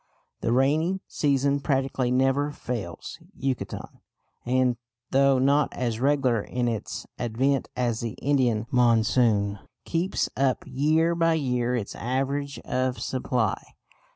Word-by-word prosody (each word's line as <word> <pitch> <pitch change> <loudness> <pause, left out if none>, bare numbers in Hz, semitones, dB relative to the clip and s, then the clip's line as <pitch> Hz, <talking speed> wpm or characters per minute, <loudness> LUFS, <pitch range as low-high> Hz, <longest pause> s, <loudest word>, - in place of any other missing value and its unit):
The - - -1
rainy 155 +9 +2
season 140 -1 +1
practically 135 -3 0
never 135 +3 +2
fails 115 - -6 0.2
Yucatan; 135 -1 -4 0.5
and, 125 -1 +2 0.3
though 135 0 +4
not 140 +3 +3
as 120 -3 -2
regular 130 -4 +2
in 125 +3 -2
its 115 -3 -4
advent 130 +4 0
as 120 -3 0
the 115 -2 -3
Indian 125 -6 +1
monsoon, 115 -4 +3 0.3
keeps 170 +3 0
up 135 -1 +1
year 155 +5 +2
by 165 -1 +2
year 125 -4 0
its 110 -5 -3
average 135 +3 -2
of 130 0 -1
supply. 125 -5 -1
130 Hz, 120 wpm, -26 LUFS, 120-140 Hz, 0.5 s, though